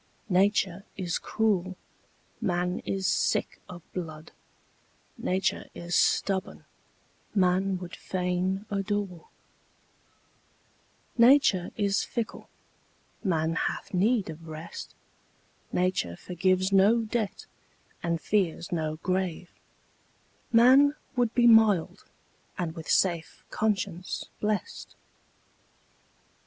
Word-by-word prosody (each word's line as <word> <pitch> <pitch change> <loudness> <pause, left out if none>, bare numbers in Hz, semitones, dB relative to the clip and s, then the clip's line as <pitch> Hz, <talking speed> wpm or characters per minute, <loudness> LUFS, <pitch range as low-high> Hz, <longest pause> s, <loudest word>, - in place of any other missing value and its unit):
Nature 190 0 +2
is 180 -3 -2
cruel, 190 -4 0 0.6
man 180 -3 0
is 195 -1 -2
sick - - 0
of 175 -2 -10
blood; 160 -3 -6 0.8
Nature 190 +1 -1
is 175 0 -6
stubborn, 190 +1 +1 0.7
man 190 0 +2
would 180 -1 -8
fain 185 +2 -2
adore; 200 -3 -2 1.9
Nature 235 -7 +5
is 200 -1 +1
fickle, 235 -3 -5 0.7
man 165 -5 +1
hath 165 - -3
need 205 +3 +2
of 165 +1 -12
rest; 160 +1 -8 0.8
Nature 180 - 0
forgives 185 - 0
no 200 +4 +5
debt, 220 -2 -3 0.6
and 170 -1 -1
fears 175 -3 -1
no 155 -3 -1
grave; 180 -2 -2 1.0
Man 265 +5 +6 0.2
would 245 -3 +2
be 240 - +4
mild, 220 -6 +4 0.5
and 170 -3 -2
with 165 -1 -9
safe 170 -4 +1
conscience 195 -4 -2
blest. 210 -3 -3
185 Hz, 90 wpm, -28 LUFS, 175-205 Hz, 1.9 s, Man